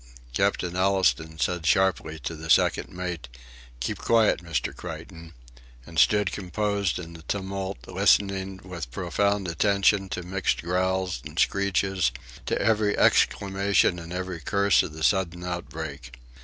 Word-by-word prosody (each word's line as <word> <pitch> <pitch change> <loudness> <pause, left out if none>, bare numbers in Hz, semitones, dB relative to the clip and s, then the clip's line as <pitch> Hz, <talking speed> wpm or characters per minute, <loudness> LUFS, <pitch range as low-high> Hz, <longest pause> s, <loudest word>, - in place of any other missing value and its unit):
Captain 90 +7 0
Allistoun 95 -4 +1
said 90 -1 0
sharply 80 -2 +2
to 65 -6 -5
the - - -8
second - - +3
mate: 90 -7 -5 0.5
"Keep - - -3
quiet, 110 -6 +3
Mr. 80 -7 -2
Creighton," 80 0 -9 0.5
and - - -3
stood 105 -2 +4
composed 100 +1 -1
in 85 -1 -8
the 80 - -11
tumult, 95 +2 -3
listening 95 -1 +2
with 85 -7 -7
profound 95 +6 0
attention 100 +2 +2
to 90 -3 -4
mixed 95 0 -1
growls 90 -4 0
and - - -10
screeches, 95 -4 +1 0.4
to - - 0
every 105 -2 +2
exclamation 100 -2 +3
and 85 0 -9
every 90 -1 -4
curse 100 +5 +3
of 75 - -5
the 80 0 -7
sudden 90 -2 +1
outbreak. 80 -7 -6
95 Hz, 135 wpm, -26 LUFS, 85-100 Hz, 0.5 s, stood